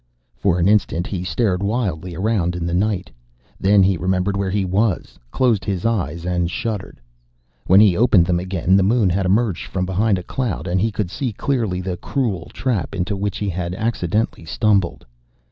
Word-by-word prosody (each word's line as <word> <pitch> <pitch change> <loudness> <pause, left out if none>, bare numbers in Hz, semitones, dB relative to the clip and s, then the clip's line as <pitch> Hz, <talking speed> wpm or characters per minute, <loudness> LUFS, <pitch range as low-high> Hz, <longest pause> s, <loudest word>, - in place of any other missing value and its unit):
For 95 -3 +1
an 85 +1 +2
instant 100 -4 +2
he 95 -3 -4
stared 90 +3 0
wildly 100 -6 -2
around 95 -3 0
in 85 -1 -3
the 85 - -2
night. 95 0 0 0.5
Then 100 0 +4
he 95 -1 +2
remembered 95 +2 0
where 100 -1 -1
he 100 0 0
was, 95 +1 -1
closed 115 - +1
his 95 -2 -3
eyes 90 -7 -1
and 90 -1 0
shuddered. 105 - -4 0.7
When 95 +2 +7
he 105 -4 +6
opened 105 -5 +4
them 85 0 +1
again, 90 0 +1
the 100 - +5
moon 105 -1 +3
had 95 +1 0
emerged 100 -2 +1
from 90 -1 -2
behind 100 +2 +1
a 90 - -5
cloud, 120 -2 -3
and 90 +1 0
he 110 +2 +1
could 100 -4 -3
see 130 +2 -2
clearly 110 -5 -1
the 90 -1 -4
cruel 105 - -2
trap 105 - -2
into 95 +2 -2
which 100 0 -2
he 105 - -2
had 90 0 -3
accidentally 110 -3 -1
stumbled. 95 - 0
95 Hz, 185 wpm, -20 LUFS, 90-105 Hz, 0.7 s, When